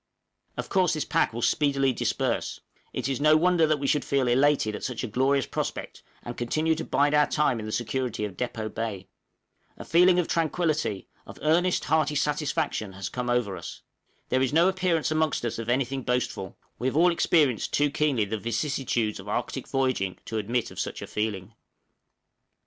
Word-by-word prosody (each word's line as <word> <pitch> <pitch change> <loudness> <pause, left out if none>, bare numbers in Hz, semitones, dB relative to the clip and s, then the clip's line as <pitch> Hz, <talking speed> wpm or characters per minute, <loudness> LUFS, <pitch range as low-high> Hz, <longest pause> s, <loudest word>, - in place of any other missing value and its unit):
Of - - -3
course 185 -3 +2
this 155 - -2
pack - - +1
will 115 +1 -5
speedily 140 -3 +2
disperse; - - -1 0.3
it - - -3
is 135 -1 -2
no 155 +1 +6
wonder 175 -1 +3
that 155 -1 +2
we 140 - -4
should 145 +2 +2
feel 135 -2 +1
elated 130 -3 +3
at - - -7
such 125 -2 -3
a - - -2
glorious 135 +4 +1
prospect, - - -4 0.2
and 120 - -6
content 155 +7 0
to - - -2
bide 145 +1 +2
our 150 0 +4
time 145 -6 +1
in 110 - -6
the - - -4
security 120 -1 -2
of 100 -3 -7
Depôt 110 -2 -4
Bay. 105 -4 -4 0.7
A - - -9
feeling 180 +2 +5
of 180 - +1
tranquillity 155 - 0 0.2
of - - -10
earnest, 175 +4 +2
hearty 155 -2 +1
satisfaction 140 -8 -1
has 95 0 -5
come 125 -1 -4
over 120 -6 0
us. 85 - -9 0.5
There 130 - +2
is 130 - +1
no 165 +4 +4
appearance 185 -4 +1
amongst 155 -5 0
us 115 0 -3
of 115 0 -5
anything 135 +1 0
boastful; 125 -6 -2 0.2
we 125 - -1
have 130 - -1
all 175 +2 +5
experienced 150 -7 +2
too 145 0 +2
keenly 145 -7 +1
the 110 +2 -3
vicissitudes 115 -1 -1
of - - -10
Arctic - - -3
voyaging 130 -9 0
to 110 - -3
admit 115 +3 -1
of - - -9
such - - -4
a - - -4
feeling. 105 -1 -3
135 Hz, 190 wpm, -26 LUFS, 115-155 Hz, 0.7 s, no